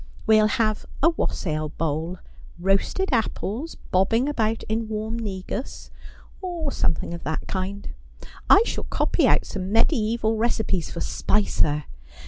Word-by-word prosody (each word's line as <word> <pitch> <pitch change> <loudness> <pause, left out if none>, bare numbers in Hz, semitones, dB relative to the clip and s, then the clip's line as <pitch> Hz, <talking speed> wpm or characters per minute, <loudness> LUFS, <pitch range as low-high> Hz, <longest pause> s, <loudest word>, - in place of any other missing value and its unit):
We'll 215 -1 +6
have 215 0 0 0.2
a 330 - +7
wassail 155 - -2
bowl: 160 +4 -2 0.4
roasted 195 - +1
apples 235 - -1 0.2
bobbing 225 +8 +3
about 225 -6 0
in 220 +1 -2
warm 220 +1 -3
negus, 200 +3 -5 0.5
or 345 -6 -3
something 165 -5 0
of 170 - -7
that 160 0 -3
kind. 195 +1 -3 0.6
I 415 - +8
shall - - -3
copy - - +1
out - - +3
some 190 -1 -4
mediasval 220 0 +2
recipes 220 -6 0
for 170 - -6
Spicer. 150 -7 +1
215 Hz, 125 wpm, -24 LUFS, 185-230 Hz, 0.6 s, I